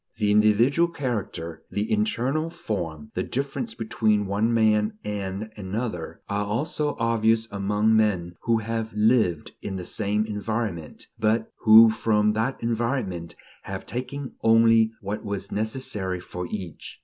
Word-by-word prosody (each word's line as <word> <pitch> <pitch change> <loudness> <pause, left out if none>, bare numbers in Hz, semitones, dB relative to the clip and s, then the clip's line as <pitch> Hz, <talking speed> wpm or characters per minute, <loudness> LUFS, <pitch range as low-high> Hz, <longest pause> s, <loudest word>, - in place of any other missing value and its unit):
The 105 -2 +2
individual 110 +10 +4
character, 100 - -4
the 105 +1 -2
internal 160 - 0
form, 80 - -5
the - - -1
difference 140 - -3
between 110 -2 +1
one 100 +4 +1
man 110 -2 +2
and 105 +1 -4
another, 100 -2 -4
are 100 0 -1
also 145 +7 -1
obvious 115 -1 +2
among 105 +2 +1
men 95 -6 +1
who 115 -1 +2
have 110 0 -3
lived 105 -7 +2
in 95 - -4
the 90 -2 -5
same 105 +2 0
environment, 105 -5 -4
but 110 +1 +1
who 110 +1 +9
from 105 -1 +2
that 110 +5 -1
environment 115 -7 -2 0.3
have - - -6
taken 130 +2 -5
only 115 0 +5
what 105 +2 -4
was 100 -2 -4
necessary 105 -4 -2
for 90 0 -6
each. 95 -6 -7
110 Hz, 135 wpm, -25 LUFS, 100-115 Hz, 0.3 s, who